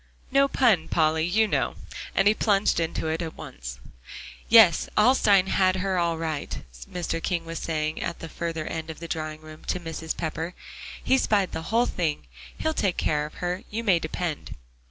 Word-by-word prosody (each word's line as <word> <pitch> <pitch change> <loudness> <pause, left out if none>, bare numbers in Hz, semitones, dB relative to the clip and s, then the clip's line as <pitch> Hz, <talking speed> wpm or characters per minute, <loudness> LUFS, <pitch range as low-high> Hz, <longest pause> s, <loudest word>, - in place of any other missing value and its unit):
No 275 +1 +5
pun, 230 - +3
Polly, 160 0 +2
you 220 +5 +3
know." - - 0 0.4
And 195 - +4
he 210 - +6
plunged 205 -4 +2
into 165 -1 -2
it 160 +1 -1
at 165 -2 -5
once. - - -8 0.7
"Yes, 220 -8 +7
Alstyne 210 -4 +5
has 185 -1 +2
her 190 -1 0
all 170 -1 +1
right," 160 -3 -3 0.3
Mr. 165 -2 -2
King 170 -1 -1
was 165 0 -5
saying 155 -1 -2
at 170 - -3
the 165 - -7
further 165 -1 -4
end 160 0 -5
of 160 - -7
the 170 - -7
drawing 155 -1 -4
room 155 0 -12
to 180 - -1
Mrs. 165 -1 -5
Pepper; 165 +2 -3 0.5
he 265 - +3
spied 200 -6 +2
the - - -4
whole 235 +2 +3
thing; 165 -9 -2 0.3
"he'll 315 - 0
take 195 - 0
care 150 -1 0
of - - -15
her, 180 +2 -2
you 225 +2 -3
may 190 -6 +4
depend." 160 -1 -4
170 Hz, 185 wpm, -26 LUFS, 160-195 Hz, 0.7 s, Yes